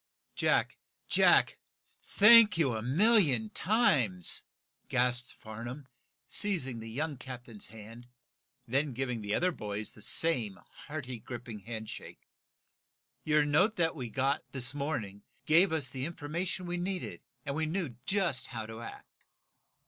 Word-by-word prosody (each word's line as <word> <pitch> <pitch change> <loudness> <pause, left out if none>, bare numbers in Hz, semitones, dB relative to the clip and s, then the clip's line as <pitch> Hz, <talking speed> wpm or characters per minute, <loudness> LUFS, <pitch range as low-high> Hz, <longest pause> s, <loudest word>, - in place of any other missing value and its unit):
"Jack! - - +1 0.3
Jack! - - +4 0.4
Thank 215 -2 +7
you 140 -7 +2
a 110 - -3
million 140 - +3
times!" 135 - +2 0.5
gasped 125 -1 0
Farnum, 120 +5 -8 0.4
seizing 140 - 0
the 115 0 -8
young 145 +5 -3
captain's 120 -4 -8
hand, 110 +3 -12 0.6
then 135 +3 0
giving 125 -3 -2
the 105 0 -1
other 180 +1 +2
boys 105 -6 -5
the 105 - -15
same 120 -8 +3 0.3
hearty 130 -5 -6
gripping 120 -2 -8
handshake. 110 +1 -8 1.0
"Your 150 -1 +3
note 185 +10 +3
that 165 -2 +1
we 125 -6 -5
got, 135 +4 0
this 130 -1 -1
morning, 135 -9 -4 0.2
gave 170 +4 +5
us 145 -5 0
the 130 0 -4
information 170 +3 -4
we 175 0 -3
needed 175 - -4 0.2
and 140 - -2
we 155 +2 -1
knew 160 -7 -3
just 190 -9 +1
how 115 -3 -6
to 110 +1 -9
act." 115 - -10
130 Hz, 135 wpm, -31 LUFS, 115-165 Hz, 1.0 s, Thank